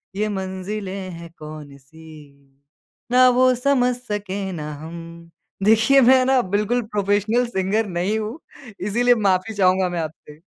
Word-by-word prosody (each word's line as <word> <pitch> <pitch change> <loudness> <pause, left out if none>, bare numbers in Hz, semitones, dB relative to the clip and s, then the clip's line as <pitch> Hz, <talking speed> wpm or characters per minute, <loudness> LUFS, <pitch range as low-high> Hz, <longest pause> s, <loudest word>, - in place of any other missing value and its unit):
ये 215 +2 -1
मंजिलें 190 0 -5
है 170 0 -10
कौन-सी, 145 -1 -13 0.5
ना 255 0 +6
वो 255 +1 +4
समझ 250 -1 +1
सके 205 -5 -5
ना 150 -4 -6
हम। 170 +1 -10 0.3
देखिए, 225 +6 +5
मैं 260 +1 +6
ना 265 -1 +3
बिल्कुल 225 +4 +1
प्रोफ़ेशनल 210 +2 0
सिंगर 210 0 0
नहीं 185 +4 -1
हूँ, 220 +7 -5 0.4
इसीलिए 240 +6 +2
माफ़ी 200 0 0
चाहूँगा 185 -1 +2
मैं 175 -1 -3
आपसे। 155 -1 -9
200 Hz, 130 wpm, -21 LUFS, 170-230 Hz, 0.5 s, ना